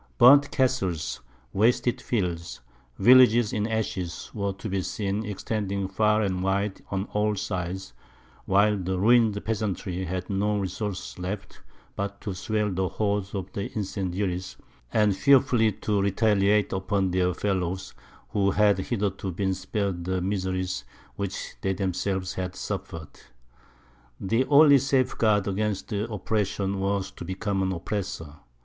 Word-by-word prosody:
Burnt 140 +3 +7
castles, 95 - 0 0.3
wasted 120 +3 +2
fields, 90 -7 -2 0.4
villages 120 -1 +6
in 105 0 0
ashes, 100 -6 -3
were 100 -2 -1
to 100 +3 -7
be 95 -2 -1
seen 100 +2 -2
extending 100 -1 -3
far 105 +3 +2
and 95 -2 -1
wide 95 +1 -1
on 95 -1 -1
all 105 0 +1
sides, 95 -1 -4 0.5
while 100 +2 +4
the 95 -1 -2
ruined 110 +1 +4
peasantry 100 -4 -2
had 90 +1 -4
no 105 +1 0
resource 95 0 -4
left 95 +2 -6 0.3
but 100 0 -4
to 100 - -4
swell 105 +2 -1
the 95 0 -1
horde 100 -2 -1
of 95 -1 -5
incendiaries, 95 -2 -3 0.3
and 105 -3 +3
fearfully 120 -3 +4
to 105 -1 -1
retaliate 100 0 +2
upon 95 0 0
their 90 0 +2
fellows, 95 -2 -2 0.4
who 100 -1 +1
had 100 0 +3
hitherto 100 -2 -2
been 95 +2 -1
spared 95 -1 -3
the 95 0 0
miseries 95 -1 -2 0.3
which 100 -2 -5
they 95 - 0
themselves 95 0 -2
had 95 -1 -4
suffered. 80 -2 -6 1.0
The 115 +7 +1
only 145 -1 +7
safeguard 120 -6 +2
against 105 +2 -2
oppression 100 -2 -1
was 100 0 -1
to - - -9
become 95 +2 -2
an 95 0 0
oppressor. 90 -4 -4
100 Hz, 130 wpm, -26 LUFS, 95-105 Hz, 1.0 s, Burnt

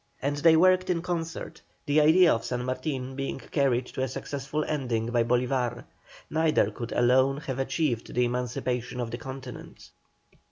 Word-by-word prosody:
And 145 +1 -1
they 160 +2 +5
worked 185 +2 +4
in 170 -2 0
concert, 165 -2 -4 0.2
the 145 +1 +3
idea 165 +3 +6
of 115 - -2
San 125 -1 -3
Martin 130 0 -3
being 135 0 -3
carried 130 -2 0
to 130 - -6
a 130 - +1
successful 140 +3 -4
ending 120 -6 -2
by 120 -1 +3
Bolívar. 125 0 0 0.4
Neither 155 -9 +2
could 115 +2 -6
alone 130 +3 +3
have 135 -3 -4
achieved 130 -2 -1
the 125 0 +3
emancipation 125 0 -2
of 120 -2 -3
the 120 - -5
Continent. 130 -3 -9
130 Hz, 160 wpm, -27 LUFS, 125-150 Hz, 0.4 s, idea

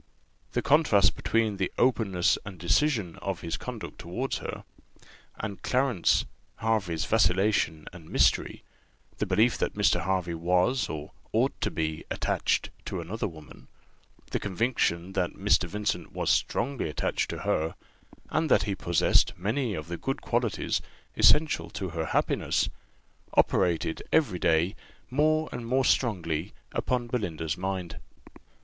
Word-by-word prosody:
The - - 0
contrast 130 -10 +4
between 110 -3 0
the 95 - -1
openness 110 -8 +3
and 100 -2 -8
decision 100 - +1
of 95 -3 -4
his 85 - -3
conduct - - -7
towards 120 +11 -3
her, - - -6 0.7
and 100 -2 -5
Clarence 125 -8 +2 0.3
Hervey's 100 -8 0
vacillation 95 -6 +2
and 85 -3 -12
mystery; - - +2 0.6
the - - 0
belief 115 +3 +3
that - - -1
Mr. 100 -4 +2
Hervey 90 -1 0
was 90 +9 +1
or 75 -1 -6 0.2
ought - - +2
to - - +1
be 80 -1 -2
attached - - 0
to 95 - -3
another 95 +7 -3
woman; 80 -7 -13 0.6
the - - 0
conviction 95 -4 0
that - - -1
Mr. - - +2
Vincent 105 0 -2
was - - +1
strongly 130 - 0
attached 75 - -1
to - - -5
her, 80 +1 0 0.6
and 160 -1 +1
that - - +5
he 100 - -1
possessed 85 -3 +2
many 110 +4 -1
of 75 -1 -6
the 85 +1 -4
good 135 +8 -2
qualities 120 -3 0 0.3
essential 150 - +4
to 95 +2 -4
her 80 0 -3
happiness, - - +1 0.7
operated 85 -3 +2
every 120 - +2
day 85 +5 +2 0.4
more 155 +3 +2
and 120 -1 -5
more 130 +2 +2
strongly 90 - 0 0.2
upon 125 -1 -1
Belinda's 90 -10 -2
mind. 95 -2 -4
95 Hz, 135 wpm, -28 LUFS, 85-120 Hz, 0.7 s, that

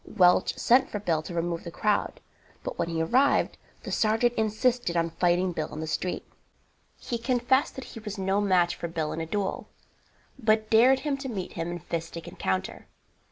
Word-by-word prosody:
Welch 180 -1 +4
sent 260 +3 +4
for 210 - -3
Bill 170 -6 0
to 160 - -8
remove 170 0 -2
the - - -6
crowd, 205 +4 -1 0.4
but - - -5
when 165 - 0
he 165 -1 0
arrived 260 +11 +2 0.2
the - - -6
sergeant 225 +2 +2
insisted 220 -3 0
on 165 0 +1
fighting 175 +2 +2
Bill 155 -2 -4
in 155 - -6
the 160 - -3
street. 180 +3 -3 0.7
He 235 - -4
confessed 255 +2 +1
that 265 - -6
he - - -7
was 210 -1 -6
no 195 +1 +1
match 180 -4 +3
for 170 - -4
Bill 160 -2 -3
in 165 - -4
a 165 - -4
duel, 200 +2 -3 0.7
but 215 -2 +2
dared 250 +4 +6
him 290 -2 -1
to 270 -1 -5
meet 195 -6 -5
him 165 0 -3
in 175 -1 -5
fistic 165 +1 -5
encounter. 95 - -3
190 Hz, 190 wpm, -27 LUFS, 170-230 Hz, 0.7 s, dared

